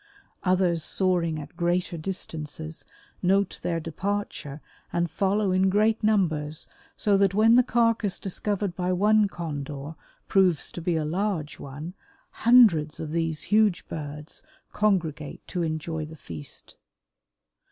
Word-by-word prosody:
Others 180 -3 +2
soaring 175 -3 +1
at 145 0 -10
greater 175 +1 0
distances 160 -2 -5 0.3
note 195 +2 +2
their 170 -1 -1
departure 165 -3 -4 0.3
and 170 -1 0
follow 200 0 +1
in 190 +1 +3
great 215 +3 +2
numbers 160 -8 +1 0.3
so 205 -1 +3
that 195 -1 +3
when 225 +2 +6
the 250 - +8
carcass 230 -5 +1
discovered 200 -1 -2
by 180 0 -1
one 210 +3 +4
Condor 145 -4 -5 0.3
proves 185 -5 +2
to 175 - -7
be 170 0 0
a 155 -1 0
large 175 -2 -2
one, 145 +5 -7 0.4
hundreds 205 -11 +5
of 155 -1 -5
these 165 -2 -1
huge 210 -4 +3
birds 150 -1 -6 0.3
congregate 165 -8 0
to 180 - -2
enjoy 160 0 -2
the 155 +1 -9
feast. 80 - -7
175 Hz, 130 wpm, -26 LUFS, 155-200 Hz, 0.4 s, the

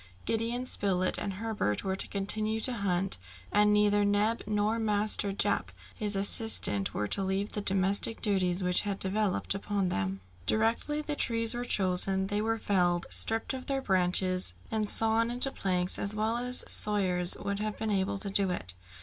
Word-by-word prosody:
Gideon 230 +3 -2
Spilett 185 -6 0
and 200 - -4
Herbert 205 - -3
were 190 -1 -2
to - - -1
continue 215 +2 -1
to 255 - +3
hunt, 195 - -2 0.3
and 210 0 +3
neither 205 0 +2
Neb 205 +3 0
nor 210 +2 -1
Master 210 -1 +1
Jup 195 - -2 0.2
his 210 -1 -3
assistant 195 - +4
were 105 - -2
to - - +2
leave 195 +2 -3
the 210 - -4
domestic 195 +3 +1
duties 185 -3 0
which 180 0 +3
had 200 -2 -4
devolved 195 0 -1
upon 195 -1 -3
them. 95 - -3 0.3
Directly 230 +7 -1
the 300 -1 -3
trees 230 -3 0
were 240 +1 -5
chosen, 190 -2 +1
they 205 +1 -2
were 225 +1 -1
felled, 175 -5 0
stripped 225 +3 +2
of 260 -1 -8
their 275 -1 -1
branches, 185 - +3 0.2
and 215 -2 -2
sawn 225 +1 +3
into 250 +3 0
planks 180 -4 +1
as 200 +1 0
well 220 +2 -1
as 250 +1 +4
sawyers 185 -4 +3
would 200 0 -4
have 215 0 -4
been 220 -1 -3
able 195 0 -1
to 195 0 -7
do 195 -1 0
it. 95 - -2
205 Hz, 175 wpm, -28 LUFS, 190-220 Hz, 0.3 s, assistant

